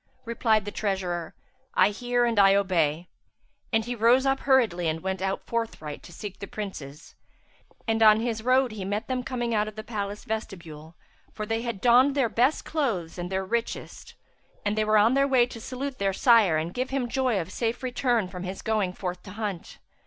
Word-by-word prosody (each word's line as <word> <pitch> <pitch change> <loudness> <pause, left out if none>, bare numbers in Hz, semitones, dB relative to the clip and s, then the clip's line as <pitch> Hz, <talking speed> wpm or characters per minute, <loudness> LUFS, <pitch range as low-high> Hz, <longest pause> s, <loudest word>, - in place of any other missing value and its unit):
Replied 225 -2 +1
the 205 - -4
treasurer, 185 -6 -3 0.4
"I 205 - +5
hear 245 +2 0
and 230 -3 +1
I 195 0 +6
obey," 175 -4 +1 0.6
and 225 -1 +1
he 245 - -3
rose 240 +3 +4
up 270 0 +2
hurriedly 225 -11 +2
and 160 0 -1
went 190 -1 -2
out 195 0 -2
forthright 225 -11 -4
to - - -13
seek 195 +3 -8
the 200 - -6
Princes; 155 -10 -8 0.7
and, 225 0 +1
on 215 -1 +7
his 225 -1 -2
road, 255 +1 +3
he 210 -3 -6
met 205 +4 -3
them 255 -1 -1
coming 240 -2 -3
out 210 -1 +1
of 215 - -8
the 215 - -6
palace 205 -2 -5
vestibule, 170 -7 -6 0.4
for 215 - -5
they 225 +1 -1
had 235 -5 -4
donned 255 +3 +5
their 265 -5 +2
best 250 +7 +1
clothes 220 - -2
and 175 +1 -5
their 190 0 -1
richest; 235 +4 -4 0.5
and 205 0 +1
they 215 - +1
were 215 0 +3
on 220 +4 +5
their 275 +1 +3
way 255 -3 +4
to 240 -2 -10
salute 260 +2 -5
their 195 -1 +1
sire 215 -7 +5
and 165 +3 -3
give 255 +1 -2
him 270 -2 -1
joy 255 -4 0
of 170 0 -5
his - - -11
safe 235 +2 -2
return 245 -4 0
from 180 0 -8
his 185 +1 -6
going 210 -5 0
forth 180 -1 -5
to 190 - -11
hunt. 205 -5 -5
215 Hz, 205 wpm, -26 LUFS, 190-240 Hz, 0.7 s, on